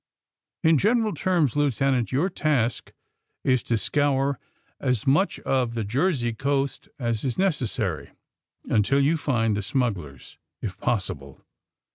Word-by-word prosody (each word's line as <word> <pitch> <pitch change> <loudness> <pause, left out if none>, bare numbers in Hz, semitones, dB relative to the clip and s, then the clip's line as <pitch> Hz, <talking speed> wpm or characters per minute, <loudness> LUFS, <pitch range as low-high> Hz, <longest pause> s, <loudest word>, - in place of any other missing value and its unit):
In 160 -2 +5
general 220 - +2
terms, 170 - +1
Lieutenant, 135 -3 +1
your 140 +8 +2
task 145 - 0 0.5
is 130 -2 +2
to 115 - 0
scour 140 +4 +1 0.4
as 125 -5 0
much 150 +9 +2
of 125 -3 0
the 115 - -1
Jersey 125 - 0
coast 140 +3 -1
as 115 -5 -2
is 130 -3 -2
necessary 125 - -1 0.6
until 115 +6 +2
you 145 +4 +3
find 120 -8 0
the 105 - -1
smugglers, 95 - -3 0.2
if 95 -3 -6
possible. 70 - -3
130 Hz, 125 wpm, -25 LUFS, 115-145 Hz, 0.6 s, In